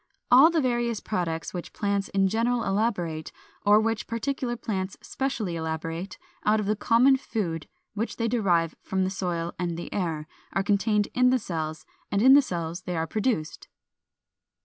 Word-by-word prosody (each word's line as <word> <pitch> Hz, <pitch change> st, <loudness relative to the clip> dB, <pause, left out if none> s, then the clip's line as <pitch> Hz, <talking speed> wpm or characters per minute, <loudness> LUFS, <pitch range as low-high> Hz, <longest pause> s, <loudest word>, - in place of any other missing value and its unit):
All 265 Hz, +6 st, +9 dB
the 335 Hz, -2 st, +1 dB
various 240 Hz, -3 st, 0 dB
products 165 Hz, -5 st, -3 dB
which 175 Hz, -2 st, -6 dB
plants 200 Hz, -1 st, -1 dB
in 195 Hz, 0 st, +2 dB
general 230 Hz, +3 st, +1 dB
elaborate, 195 Hz, -6 st, -1 dB, 0.3 s
or 210 Hz, +1 st, +6 dB
which 225 Hz, 0 st, -1 dB
particular 240 Hz, +1 st, -2 dB
plants 195 Hz, -4 st, -3 dB
specially 235 Hz, -10 st, -3 dB
elaborate, 165 Hz, +3 st, -4 dB, 0.3 s
out 215 Hz, +1 st, +3 dB
of 210 Hz, -, -2 dB
the 210 Hz, +2 st, +1 dB
common 245 Hz, +5 st, +4 dB
food 175 Hz, -, -3 dB, 0.3 s
which 220 Hz, +2 st, -3 dB
they 230 Hz, -, 0 dB
derive 180 Hz, -8 st, +2 dB
from 190 Hz, 0 st, -1 dB
the 185 Hz, -, -1 dB
soil 175 Hz, -3 st, -2 dB
and 175 Hz, -2 st, -2 dB
the 170 Hz, -, -6 dB
air, 165 Hz, -6 st, -2 dB, 0.3 s
are 195 Hz, -, +1 dB
contained 205 Hz, +1 st, +2 dB
in 250 Hz, 0 st, +4 dB
the 255 Hz, -, +4 dB
cells, 160 Hz, -7 st, -4 dB, 0.2 s
and 200 Hz, -, +1 dB
in 260 Hz, +1 st, +8 dB
the 285 Hz, -, +8 dB
cells 170 Hz, -6 st, -4 dB
they 180 Hz, -2 st, -4 dB
are 160 Hz, -, 0 dB
produced. 210 Hz, -5 st, -2 dB
200 Hz, 170 wpm, -26 LUFS, 170-230 Hz, 0.3 s, All